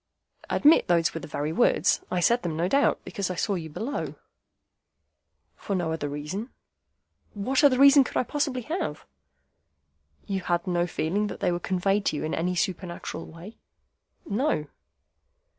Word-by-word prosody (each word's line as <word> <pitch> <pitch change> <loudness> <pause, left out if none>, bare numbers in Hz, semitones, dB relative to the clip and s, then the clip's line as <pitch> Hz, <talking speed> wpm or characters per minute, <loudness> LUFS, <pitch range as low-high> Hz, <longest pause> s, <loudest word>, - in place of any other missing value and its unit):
"Admit 305 +3 +5
those 170 -1 +2
were 165 - -4
the - - -9
very 150 +1 -3
words. 240 - +3
I 180 - 0
said 235 +7 +3
them, 165 -3 -3
no 170 +2 +1
doubt, 280 +8 +2
because 185 +1 -3
I 185 - -3
saw 200 - 0
you 165 -4 -4
below." 235 - -4 1.4
"For 200 - -4
no 175 -3 -1
other 155 -3 -3
reason?" 150 - -5 0.9
"What 255 +8 0
other 275 -3 +6
reason 280 +1 +8
could - - -4
I - - +3
possibly 275 -2 -2
have?" 315 - -4 1.2
"You 195 -1 -2
had 175 -1 -1
no 175 -1 0
feeling 195 +6 -1
that - - -7
they - - +1
were 175 - -1
conveyed 195 +3 0
to - - +1
you - - -3
in 155 - -2
any 180 +2 -1
supernatural 175 -2 -3
way?" 175 +7 -12 0.7
"No." 210 - 0
185 Hz, 160 wpm, -26 LUFS, 165-235 Hz, 1.4 s, reason